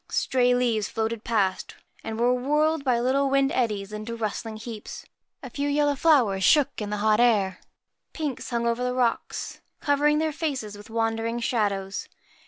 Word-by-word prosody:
Stray 250 -1 +2
leaves 235 -4 0
floated 225 0 -2
past 200 -5 -1 0.3
and 220 0 -5
were 245 +1 +3
whirled 300 +4 +1
by 250 -4 +2
little 270 +3 +1
wind 275 0 +2
eddies 210 -4 -1
into 215 +2 -5
rustling 220 0 -4
heaps. 220 -1 -8 0.4
A 260 - -6
few 285 +3 -2
yellow 290 0 +2
flowers 255 -11 +3
shook 290 +1 +3
in 210 - -3
the 210 - -2
hot 215 0 +4
air. 205 -6 +3 0.5
Pinks 295 -6 -4
hung 235 -1 -1
over 235 +1 0
the 250 0 -1
rocks, 245 -2 -2 0.2
covering 295 +1 +2
their 315 0 0
faces 270 -10 -3
with 205 +1 -13
wandering 225 +1 -1
shadows. 200 -5 -1
235 Hz, 165 wpm, -25 LUFS, 215-275 Hz, 0.5 s, hot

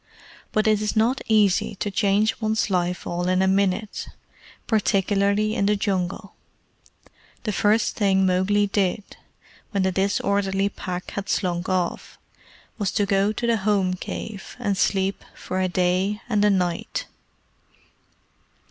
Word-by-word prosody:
But 215 - +1
it 215 -1 +3
is 210 +1 -1
not 230 +5 +2
easy 210 -3 +3
to 205 +1 -3
change 205 +3 +1
one's 220 -1 0
life 180 -1 -1
all 175 +1 -2
in 185 +1 +2
a - - +2
minute 195 +2 0 0.6
particularly 205 0 +1
in 200 -4 +1
the 210 - +3
Jungle. 195 -1 -2 1.1
The 215 - -1
first 210 +2 +1
thing 195 -2 +3
Mowgli 190 +3 +2
did, 200 0 0 0.7
when 200 -4 0
the 190 - +2
disorderly 195 +1 0
Pack 180 -2 -6
had 200 0 -5
slunk 180 -1 -1
off, 185 -2 -2 0.6
was 200 -3 0
to 205 - +2
go 200 0 +2
to 225 +3 -3
the 235 -1 +2
home 195 -3 +1
cave, 200 +2 -7
and 210 -5 -1
sleep 190 +1 0
for 185 0 -3
a 185 - +2
day 185 +3 +1
and 210 -4 +1
a 210 - +5
night. 180 -3 -1
200 Hz, 140 wpm, -23 LUFS, 185-210 Hz, 1.1 s, a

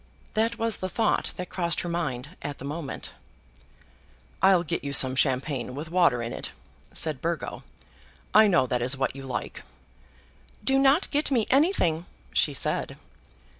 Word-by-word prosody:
That 225 +2 +1
was 225 -2 +1
the 185 - -4
thought 220 +3 +1
that 180 -1 -6
crossed 170 -3 0
her - - -5
mind 150 -3 -3
at 145 0 -5
the - - -8
moment. 145 0 -5 1.3
"I'll 190 -3 +5
get 165 - -3
you 140 0 -4
some 130 -1 +4
champagne 130 -1 0
with 155 +3 -6
water 170 -10 +3
in 115 - -4
it," - - -5 0.4
said 155 -5 -1
Burgo. 170 -1 -3 0.7
"I 215 0 +7
know 150 -10 +4
that 125 -1 -1
is 125 +3 +2
what 135 0 -1
you 135 - -7
like." 135 -1 -5 1.0
"Do 270 0 +3
not 275 +6 +3
get 295 +1 +1
me 240 -6 +2
anything," 255 - +3 0.3
she - - +3
said. - - -1
165 Hz, 160 wpm, -26 LUFS, 135-215 Hz, 1.3 s, I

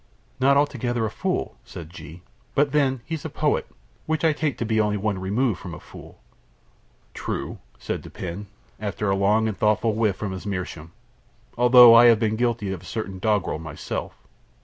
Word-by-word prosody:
"Not 140 +2 +4
altogether 120 -5 0
a 110 - -3
fool," - - -3
said 80 -2 -10
G; 85 +1 -11 0.3
"but, 145 0 +2
then, 135 -4 +1
he 165 - -6
is 160 - -4
a - - -4
poet, - - 0 0.4
which 160 +1 0
I 160 - +4
take 145 -2 -2
to 115 - -2
be 110 0 +2
only 105 -1 0
one 100 -1 -2
remove 105 +3 0
from 90 -3 -8
a - - -10
fool." - - -14 0.9
"True," - - -5 0.2
said - - -4
Dupin, 95 +3 -7 0.3
after 105 -1 -2
a - - +2
long 105 +3 +2
and 110 - -2
thoughtful 110 +2 +1
whiff 105 -3 +1
from 100 0 -4
his 95 +2 -7
meerschaum, 90 -4 -5 0.6
"although 125 -1 +8
I 115 +1 +8
have 115 -2 +7
been 110 -1 0
guilty 115 -4 -1
of 95 -2 -6
certain 95 -1 -5
doggrel 105 -6 0
myself." 80 -2 -6
110 Hz, 180 wpm, -24 LUFS, 95-120 Hz, 0.9 s, although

